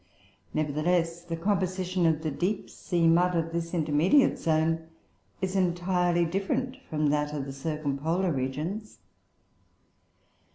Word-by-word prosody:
Nevertheless 165 +3 0
the 170 -1 -5
composition 185 -1 0
of 160 -1 +1
the 155 - -1
deep 190 +8 -2
sea 170 -2 -1
mud 175 +2 +4
of 165 0 0
this 170 0 -2
intermediate 165 - +3
zone 160 0 +1 0.5
is 190 0 -1
entirely 175 -1 +2
different 200 +9 -1
from 150 -2 +1
that 150 0 0
of 140 -2 -3
the 135 - -6
circumpolar 155 +4 -1
regions. 155 +11 -3
170 Hz, 120 wpm, -28 LUFS, 155-180 Hz, 0.5 s, mud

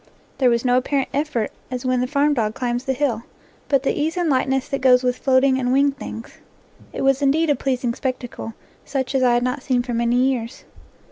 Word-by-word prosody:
There 255 -2 +4
was 235 +1 0
no 250 0 +4
apparent 270 +1 0
effort, 285 -6 -1 0.2
as 255 -1 -5
when 255 -1 +1
the 250 - 0
farm 290 +2 +2
dog 220 -5 -1
climbs 245 0 -2
the 265 - 0
hill, 255 -5 -1 0.5
but 275 -2 +2
the - - +1
ease 315 +4 -2
and 345 -4 +1
lightness 265 0 +1
that 275 - -2
goes 250 -1 +5
with 250 -1 +1
floating 265 0 +3
and 250 -1 0
winged 275 +1 +3
things. 225 -3 -8 0.5
It - - -4
was 270 +1 +2
indeed 295 +3 +2
a - - +3
pleasing 255 -3 -1
spectacle, 245 -3 -5 0.3
such 265 -2 -3
as 265 - +2
I 245 -1 +4
had 240 - +1
not 255 +2 -2
seen 250 -2 0
for 245 -1 -4
many 235 +1 +1
years. 250 -2 0
260 Hz, 215 wpm, -21 LUFS, 245-275 Hz, 0.5 s, goes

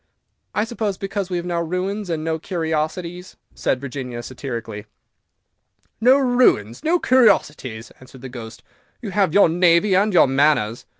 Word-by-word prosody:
"I 210 - +2
suppose 220 -4 -3
because 195 -1 -4
we 180 - -2
have 175 - -4
no 175 -1 -2
ruins 185 +4 -3
and 160 -2 -2
no 160 0 -2
curiosities," 170 +2 -4 0.2
said 130 - -1
Virginia, 125 -3 -6
satirically. 115 -5 -7 1.1
"No 255 +4 +6
ruins! 245 - +2
no 335 +3 +2
curiosities!" 155 - +1
answered 130 0 -15
the 130 - -7
Ghost; 115 -3 -10 0.4
"you 205 - -5
have 195 -4 +1
your 200 - +6
navy 175 +3 +3
and 205 +3 +3
your 180 - +6
manners." 135 -5 +1
170 Hz, 145 wpm, -21 LUFS, 130-200 Hz, 1.1 s, No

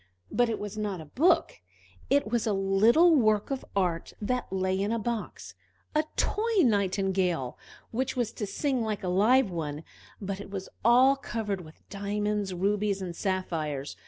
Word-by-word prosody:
But 245 -1 +2
it 225 - -1
was 210 +1 -6
not 205 -4 -2
a 160 - -8
book: 290 - +2 0.5
it 280 -3 +3
was 235 -2 0
a 215 - +2
little 215 - +5
work 215 -3 +2
of 270 - -2
art, 175 -4 -1
that 245 0 -2
lay 190 0 0
in 205 +2 0
a 230 - +1
box; 230 0 -4 0.4
a 305 0 +2
toy 430 -3 +1
nightingale, 190 - +1 0.4
which 255 +4 -2
was 240 -3 -1
to 210 - -5
sing 260 +5 -1
like 215 -3 -2
a - - -2
live 215 +5 +4
one, 155 -3 -4 0.4
but 195 -1 -4
it 205 - -10
was 195 -1 -6
all 250 +4 +6
covered 220 -7 -4
with 155 -2 -16
diamonds, 205 0 -2
rubies, 200 +2 0
and 180 -3 -5
sapphires. 160 -8 -2
205 Hz, 165 wpm, -28 LUFS, 190-235 Hz, 0.5 s, all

